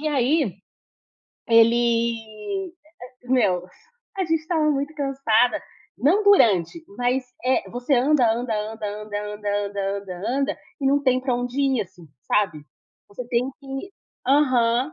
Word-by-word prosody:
E 310 - -4
aí, 275 - +1 0.9
ele, 230 0 +6
e 235 - -1 0.5
e 245 - -17
meus, 185 -8 +2 0.5
a 385 - 0
gente 325 -2 +1
estava 315 -1 +1
muito 285 +1 -1
cansada, 270 -5 +1 0.4
não 350 +11 +3
durante, 235 - +4 0.2
mas, 250 +2 0 0.2
eh, 255 +1 +1
você 245 +3 0
anda, 255 -1 +3
anda, 235 0 -2 0.2
anda, 220 -1 -6 0.2
anda, 210 -1 -5 0.2
anda, 205 0 -2
anda, 200 0 -3
anda, 190 0 -6
anda, 280 +2 -1 0.2
e 275 - 0
não 280 +1 +3
tem 255 -2 +2
para 255 -1 -1
onde 245 +2 -2
ir, 270 -3 +2
assim, 180 -3 -16 0.2
sabe, 190 -7 +1 0.5
você 230 +4 -8
tem 245 +1 +1
que 270 +6 -7 0.4
Aham, 255 -1 +3
245 Hz, 145 wpm, -23 LUFS, 220-280 Hz, 0.9 s, ele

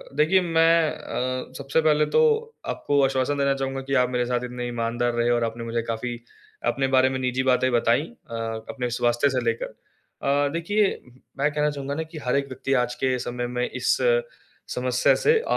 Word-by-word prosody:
देखिए 155 +6 +4
मैं 165 -2 +3
अ, 130 0 -4
सबसे 140 +3 0
पहले 150 -1 +3
तो 470 - +6 0.5
आपको 145 -1 +1
आश्वासन 135 +2 0
देना 140 0 +2
चाहूँगा 135 0 -3
कि - - 0
आप 125 - -1
मेरे 125 -1 0
साथ 125 0 -1
इतने 125 0 -5
ईमानदार 120 0 -1
रहे 120 0 +1
और 120 -1 +2
आपने 115 +1 -3
मुझे 115 0 -2
काफ़ी 120 +1 -4 0.5
अपने 135 +2 0
बारे 130 0 +4
में 130 - -3
निजी 130 0 0
बातें 130 0 +2
बताई 120 +2 +3
अ, 155 - -10 0.3
अपने 125 -2 -3
स्वास्थ्य 120 +3 +2
से 130 -2 0
लेकर। 115 0 0
अ, 140 +1 -3
देखिए 200 +5 +1 0.4
मैं 145 +2 +1
कहना 150 0 +1
चाहूँगा 140 -1 -4
ना 160 - -2
कि 160 0 -11
हर 125 - +1
एक 140 0 0
व्यक्ति 135 +1 -3
आज 125 - -7
के 130 -1 +2
समय 120 0 -3
में 125 - 0
इस - - +1 0.8
समस्या 125 0 +2
से 455 0 +5
अ, - - -6
130 Hz, 195 wpm, -24 LUFS, 120-145 Hz, 0.8 s, तो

